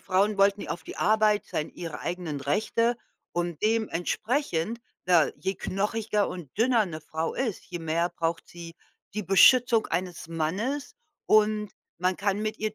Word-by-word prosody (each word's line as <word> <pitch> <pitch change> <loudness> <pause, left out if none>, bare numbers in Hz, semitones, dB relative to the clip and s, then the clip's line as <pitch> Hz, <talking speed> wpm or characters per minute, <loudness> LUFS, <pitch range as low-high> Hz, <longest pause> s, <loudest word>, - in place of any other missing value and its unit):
Frauen 200 +2 +2
wollten 200 +1 +4
ja - - -6
auf 170 - -4
die - - -8
Arbeit 215 -1 +3
sein 155 - -3
ihre 165 -3 -7
eigenen 170 -5 -4
Rechte 220 - +1 0.4
und 175 -2 -2
dementsprechend, 220 - 0 0.3
da 175 -4 +5
je 190 - -2
knochiger 210 +1 -1
und 175 -5 -8
dünner 230 -1 +3
'ne 160 -3 -6
Frau 160 +1 -3
ist, 235 -7 -2
je 175 -1 -5
mehr 165 +2 0
braucht 165 -1 -2
sie 170 -1 -10 0.4
die 210 0 -3
„Beschützung 230 +5 +6
eines 175 -1 -3
Mannes”, 195 - -2 0.3
und 215 -1 +3 0.3
man 180 +1 +1
kann 200 0 0
mit 215 0 -3
ihr 215 0 -2
195 Hz, 155 wpm, -27 LUFS, 170-215 Hz, 0.4 s, Beschützung